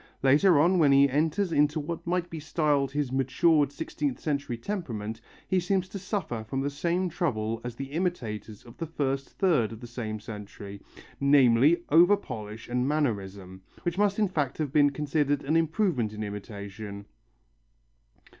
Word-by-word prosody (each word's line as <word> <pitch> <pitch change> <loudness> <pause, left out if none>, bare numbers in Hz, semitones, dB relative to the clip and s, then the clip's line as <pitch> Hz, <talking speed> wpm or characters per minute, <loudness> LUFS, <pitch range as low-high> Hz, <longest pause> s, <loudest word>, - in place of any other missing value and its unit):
Later 145 +5 +5
on 175 +4 +4
when 145 -4 +5
he 140 0 +6
enters 160 +7 0
into 150 0 +2
what 165 +3 -5
might 175 0 0
be 165 -2 -7
styled 150 -3 +1
his 145 -2 -2
matured 140 +3 +2
sixteenth 145 -2 -3
century 140 -5 -2
temperament, 115 - -5 0.3
he 190 - +2
seems 185 +1 0
to 200 - -6
suffer 180 - -3
from 135 +5 -3
the 140 +1 -1
same 175 +5 0
trouble 115 - -2
as 120 -1 -5
the 135 +2 -7
imitators 120 - -3
of 120 - -14
the 165 - -4
first 135 -3 -2
third 155 - +1
of 110 - -8
the 120 - -9
said 115 -3 -5
century, 105 -2 -9 0.4
namely, 140 +3 +5
over 175 +7 +6
polish 110 - -8
and 125 +1 0
mannerism, 100 -10 -2 0.2
which 175 +2 -2
must 205 -1 +2
in 215 -2 +3
fact 145 -7 -2
have 150 -3 -3
been 145 -1 +5
considered 145 0 0
an 150 +4 0
improvement 160 - +1
in 105 0 -5
imitation. 100 0 -7
140 Hz, 165 wpm, -28 LUFS, 115-165 Hz, 0.4 s, he